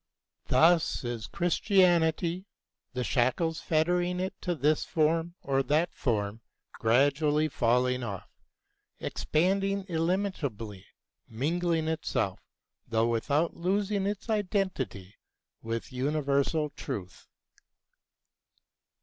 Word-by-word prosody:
Thus 165 Hz, +3 st, +4 dB
is 120 Hz, -2 st, -4 dB
Christianity, 175 Hz, -1 st, +2 dB, 0.5 s
the 125 Hz, 0 st, -2 dB
shackles 140 Hz, +8 st, +1 dB
fettering 175 Hz, +3 st, +1 dB
it 190 Hz, +2 st, -2 dB
to 175 Hz, -1 st, -1 dB
this 150 Hz, +1 st, +2 dB
form 165 Hz, +2 st, 0 dB
or 135 Hz, -1 st, +1 dB
that 155 Hz, +5 st, +1 dB
form 105 Hz, -2 st, -1 dB, 0.3 s
gradually 145 Hz, +6 st, +2 dB
falling 125 Hz, -1 st, +1 dB
off, 100 Hz, -6 st, -5 dB, 0.7 s
expanding 195 Hz, +4 st, 0 dB
illimitably, 160 Hz, -, -2 dB, 0.4 s
mingling 160 Hz, +6 st, 0 dB
itself, 160 Hz, 0 st, -1 dB, 0.5 s
though 115 Hz, 0 st, +1 dB
without 140 Hz, +8 st, 0 dB
losing 195 Hz, +2 st, 0 dB
its 205 Hz, +2 st, -4 dB
identity, 185 Hz, -, -2 dB, 0.4 s
with 115 Hz, +3 st, -4 dB
universal 140 Hz, +2 st, 0 dB
truth. 100 Hz, -13 st, -7 dB
155 Hz, 90 wpm, -29 LUFS, 125-175 Hz, 0.7 s, Thus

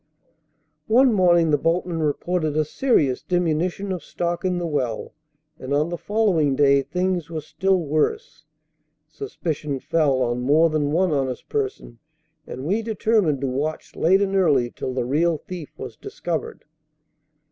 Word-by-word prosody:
One 250 Hz, +2 st, +5 dB
morning 175 Hz, -4 st, +4 dB
the 150 Hz, -, +3 dB
boatman 165 Hz, +1 st, 0 dB
reported 155 Hz, +1 st, -1 dB
a 155 Hz, -, +2 dB
serious 155 Hz, -, +1 dB
diminution 180 Hz, +2 st, -1 dB
of 180 Hz, -2 st, -4 dB
stock 175 Hz, +1 st, -3 dB
in 185 Hz, -1 st, 0 dB
the 175 Hz, -, -2 dB
well, 130 Hz, -8 st, -2 dB, 0.5 s
and 130 Hz, +2 st, -2 dB
on 150 Hz, +3 st, +1 dB
the 175 Hz, -, -3 dB
following 190 Hz, -10 st, +1 dB
day 140 Hz, 0 st, +4 dB
things 180 Hz, +3 st, -2 dB
were 160 Hz, -2 st, -4 dB
still 190 Hz, +5 st, 0 dB
worse. 165 Hz, -, -1 dB, 0.6 s
Suspicion 155 Hz, -, -4 dB
fell 140 Hz, -4 st, +1 dB
on 120 Hz, 0 st, -1 dB
more 155 Hz, +5 st, +4 dB
than 150 Hz, -2 st, 0 dB
one 180 Hz, +2 st, +2 dB
honest 135 Hz, -3 st, -2 dB
person, 405 Hz, -, -3 dB, 0.5 s
and 130 Hz, -, -7 dB
we 200 Hz, +8 st, +1 dB
determined 215 Hz, -, +1 dB
to 135 Hz, -, 0 dB
watch 145 Hz, +5 st, -3 dB
late 190 Hz, +4 st, +3 dB
and 195 Hz, 0 st, -1 dB
early 140 Hz, -10 st, +3 dB
till 130 Hz, -, -5 dB
the 125 Hz, -2 st, -1 dB
real 160 Hz, +5 st, +1 dB
thief 170 Hz, 0 st, -9 dB
was 125 Hz, -4 st, -7 dB
discovered. 170 Hz, -2 st, -5 dB
165 Hz, 150 wpm, -23 LUFS, 145-185 Hz, 0.6 s, One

